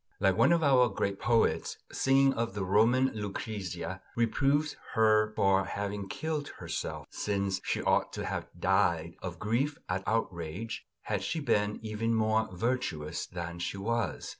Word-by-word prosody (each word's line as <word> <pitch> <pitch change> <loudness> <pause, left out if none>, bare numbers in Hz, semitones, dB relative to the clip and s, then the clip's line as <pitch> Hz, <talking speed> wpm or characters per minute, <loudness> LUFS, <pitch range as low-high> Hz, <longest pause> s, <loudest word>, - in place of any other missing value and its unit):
Like 95 -2 +3
one - - +5
of 170 -1 +3
our 130 -4 +5
great 100 -1 -2
poets 115 0 +2 0.2
who, - - -16
singing 135 0 +4
of 115 -1 -2
the 100 - -1
Roman 115 +7 +4
Lucrezia, 95 -4 -4
reproves 140 +6 +2 0.2
her 110 -1 +4
for 95 0 +3
having 100 -1 -4
killed 155 +2 -3
herself; - - -4
since 100 -2 -1
she - - -1
ought - - +2
to - - -4
have - - -3
died 85 -3 +2
of 90 -2 -5
grief 120 - 0
at 95 +1 -2
the - - -2
outrage, 95 -1 -3 0.2
had - - -1
she 165 - -2
been 105 -7 +1
even 110 +1 -1
more 110 0 +2
virtuous 90 -7 -2
than 85 -1 -6
she 90 - -3
was. 115 +3 -1
105 Hz, 160 wpm, -30 LUFS, 95-120 Hz, 0.2 s, one